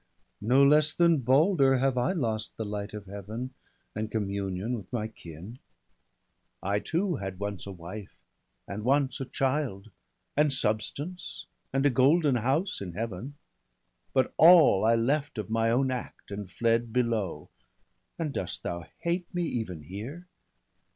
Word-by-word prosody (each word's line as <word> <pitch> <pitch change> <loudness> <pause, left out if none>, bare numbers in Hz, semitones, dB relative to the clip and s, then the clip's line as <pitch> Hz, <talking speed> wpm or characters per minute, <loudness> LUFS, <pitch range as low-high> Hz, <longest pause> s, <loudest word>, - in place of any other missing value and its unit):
No 130 +5 +5
less 150 +2 +5
than 170 -3 +4
Balder 135 - +4
have 135 0 +2
I 125 0 +1
lost 110 - -2
the 110 - -3
light 105 0 -4
Of 105 -1 -7
Heaven, 105 +6 -6 0.4
and 105 +1 -3
communion 100 0 -2
with 100 -6 -9
my 115 -3 -1
kin; 95 +3 -11 1.0
I 100 +2 +1
too 175 - -1
had 95 -3 -5
once 100 0 -4
a - - -5
wife, 95 +3 -9 0.5
and 105 +2 -5
once 135 +1 +2
a - - -2
child, 130 -7 -1 0.4
And 150 0 +4
substance, 135 +9 -2 0.3
and 135 +1 +1
a 145 - +5
golden 140 +2 +4
house 135 - 0
in 90 -3 -5
Heaven 115 +6 -5 0.4
— - - -46
But 130 -1 +2
all 165 - +8
I 115 +1 +5
left 135 +4 0
of 110 0 -4
my 115 0 +2
own 130 +3 +2
act, 125 -4 -6
and 100 -2 -5
fled 115 +4 +1
Below, 115 -6 -1 0.7
and 155 -4 -2
dost 90 - -4
thou 85 -1 -4
hate 170 +1 -1
me 175 - +1
even 110 - -3
here? 115 - -7
115 Hz, 150 wpm, -28 LUFS, 100-140 Hz, 1.0 s, all